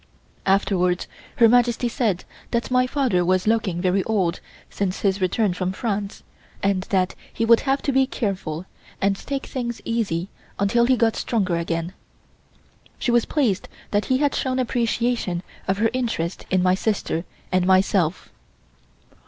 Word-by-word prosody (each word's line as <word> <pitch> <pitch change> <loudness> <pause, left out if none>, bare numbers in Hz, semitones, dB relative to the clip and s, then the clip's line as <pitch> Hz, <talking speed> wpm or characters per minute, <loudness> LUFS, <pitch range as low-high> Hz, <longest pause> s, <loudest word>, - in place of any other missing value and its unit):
Afterwards 185 -2 +2 0.3
Her 230 - +6
Majesty 240 +1 +3
said 220 -6 0 0.3
that 235 +1 -1
my 255 0 +3
father 255 -10 +1
was 185 +1 +2
looking 215 -6 +1
very 185 +1 +2
old 190 -6 0 0.3
since 195 -2 -3
his 195 -1 +1
return 185 +2 +1
from 185 +1 -2
France 205 -1 -3 0.4
and 195 -1 +2
that 185 -2 +1 0.2
he 230 - -1
would 230 0 +6
have 275 0 0
to 280 - +1
be 265 0 +3
careful 185 - -3 0.3
and 195 0 +2
take 275 +6 -4
things 240 -3 -4
easy 195 -6 -1 0.3
until 235 +4 +3
he 255 +1 +3
got 230 -1 +2
stronger 200 -7 0
again. 170 +1 -2 1.0
She 245 - 0
was 240 -1 +3
pleased 240 - 0 0.2
that 205 0 +1
he 260 - +2
had 285 0 +1
shown 260 -1 -1
appreciation 235 -6 0 0.2
of 190 0 +1
her 225 +2 +2
interest 225 -9 -2
in 185 -1 +2
my 185 0 +4
sister 190 -4 -1 0.3
and 185 -1 +2
myself. 185 -2 +2
200 Hz, 155 wpm, -23 LUFS, 185-240 Hz, 1.0 s, Her